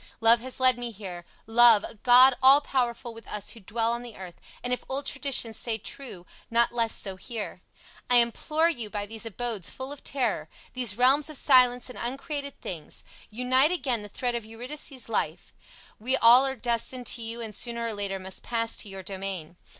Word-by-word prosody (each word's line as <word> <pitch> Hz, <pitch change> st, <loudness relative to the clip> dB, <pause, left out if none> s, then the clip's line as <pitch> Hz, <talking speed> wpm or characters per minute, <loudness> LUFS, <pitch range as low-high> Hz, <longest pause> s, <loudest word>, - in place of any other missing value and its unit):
Love 230 Hz, +1 st, +6 dB
has 260 Hz, +3 st, -4 dB
led 255 Hz, -2 st, +4 dB
me 240 Hz, 0 st, -3 dB
here, 190 Hz, -5 st, -8 dB, 0.2 s
Love, 225 Hz, -2 st, +6 dB
a -, -, -7 dB
god 245 Hz, +4 st, +6 dB
all 270 Hz, +2 st, +8 dB
powerful 245 Hz, -4 st, -2 dB
with 225 Hz, -1 st, -13 dB
us 210 Hz, -1 st, -5 dB
who 230 Hz, -, -10 dB
dwell 225 Hz, +3 st, -2 dB
on 235 Hz, 0 st, -3 dB
the 240 Hz, -2 st, -10 dB
earth, 180 Hz, -2 st, -11 dB, 0.2 s
and, 250 Hz, 0 st, -1 dB
if 250 Hz, -, -3 dB
old 275 Hz, +2 st, -2 dB
traditions 265 Hz, -5 st, +1 dB
say 230 Hz, -2 st, -1 dB
true, 215 Hz, -5 st, -8 dB, 0.2 s
not 235 Hz, +1 st, +2 dB
less 230 Hz, -2 st, 0 dB
so 195 Hz, -2 st, -1 dB
here. 220 Hz, +3 st, -7 dB, 0.5 s
I 245 Hz, -, +5 dB
implore 305 Hz, +7 st, +2 dB
you 240 Hz, -10 st, -2 dB
by 205 Hz, 0 st, -4 dB
these 225 Hz, +2 st, -6 dB
abodes 225 Hz, -4 st, -4 dB
full 260 Hz, +1 st, -7 dB
of 290 Hz, -, -9 dB
terror, 225 Hz, -, -2 dB, 0.2 s
these 240 Hz, -5 st, +1 dB
realms 275 Hz, +4 st, +4 dB
of 305 Hz, -, -4 dB
silence 250 Hz, -3 st, +4 dB
and 250 Hz, -, -9 dB
uncreated 280 Hz, +3 st, -4 dB
things, 160 Hz, -5 st, -6 dB, 0.3 s
unite 255 Hz, +5 st, +2 dB
again 270 Hz, -10 st, -1 dB
the 205 Hz, -, -9 dB
thread 245 Hz, +4 st, -2 dB
of 235 Hz, -1 st, -3 dB
Eurydice's 250 Hz, +4 st, -5 dB
life. 225 Hz, -, -3 dB, 0.5 s
We 255 Hz, +5 st, 0 dB
all 245 Hz, +3 st, +7 dB
are 265 Hz, -, -3 dB
destined 245 Hz, +1 st, 0 dB
to 235 Hz, -, -3 dB
you 230 Hz, +1 st, -6 dB
and 225 Hz, -2 st, -6 dB
sooner 235 Hz, +2 st, -3 dB
or 230 Hz, -, -3 dB
later 200 Hz, -2 st, -3 dB
must 190 Hz, 0 st, -4 dB
pass 230 Hz, -1 st, -2 dB
to 205 Hz, -, -4 dB
your 195 Hz, -1 st, -8 dB
domain. 190 Hz, -4 st, -6 dB
235 Hz, 195 wpm, -26 LUFS, 215-255 Hz, 0.5 s, all